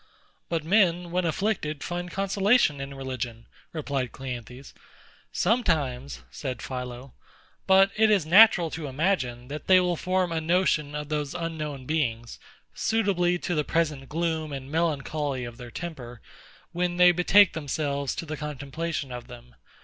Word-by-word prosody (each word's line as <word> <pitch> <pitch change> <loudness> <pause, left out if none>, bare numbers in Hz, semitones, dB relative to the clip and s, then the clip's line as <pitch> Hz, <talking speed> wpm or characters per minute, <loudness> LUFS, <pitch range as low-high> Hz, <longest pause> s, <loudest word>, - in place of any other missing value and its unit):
But 165 -2 -1
men, 175 -1 +2
when 180 0 0
afflicted, 165 -4 -1
find 175 0 -4
consolation 195 - +2
in 135 0 -6
religion, 130 -4 -5 0.3
replied 140 -5 -3
CLEANTHES. 125 0 -8 0.6
Sometimes, 145 - 0
said 115 - -5
PHILO: 125 0 -6 0.5
but 195 +1 +6
it 220 0 +4
is 200 -7 +3
natural 175 -2 +6
to 160 -1 -5
imagine, 130 -5 -1
that 150 +2 -7
they 185 -1 +7
will 180 -1 +1
form 185 +1 0
a 165 -1 -1
notion 160 -3 +1
of 150 0 -5
those 150 -2 -2
unknown 155 -5 -4
beings, 120 -7 -2 0.3
suitably 190 -6 +1
to 175 - -3
the 150 -2 +1
present 150 -4 -1
gloom 160 -1 -2
and 135 0 -7
melancholy 150 -4 -1
of 120 -1 -9
their 125 -2 -9
temper, 125 -6 -7 0.5
when 175 0 -1
they 180 0 +7
betake 180 +3 +5
themselves 140 -2 -2
to - - -5
the 155 -1 -5
contemplation 150 0 -4
of 125 -1 -7
them. 120 0 -13
155 Hz, 145 wpm, -26 LUFS, 135-175 Hz, 0.6 s, they